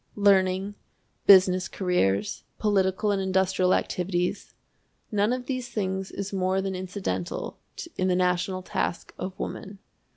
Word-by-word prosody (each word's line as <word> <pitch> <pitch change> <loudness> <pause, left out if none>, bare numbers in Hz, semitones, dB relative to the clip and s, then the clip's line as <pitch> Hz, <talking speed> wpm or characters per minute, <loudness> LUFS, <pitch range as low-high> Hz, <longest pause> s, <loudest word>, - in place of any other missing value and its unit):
Learning, 195 -1 +3 0.5
business 185 -1 +7
careers, 105 - 0
political 205 0 +1
and 195 -1 0
industrial 190 -1 +2
activities 180 +2 -1 0.6
none 210 +1 +2
of 250 0 -2
these 255 -2 -3
things 190 -2 -2
is 200 0 -5
more 190 0 +1
than 195 0 -2
incidental 185 - -4 0.4
in 185 - +1
the 180 - +2
national 180 +1 0
task 170 - -3
of 185 0 -5
woman. 195 +1 -6
190 Hz, 125 wpm, -26 LUFS, 185-200 Hz, 0.6 s, business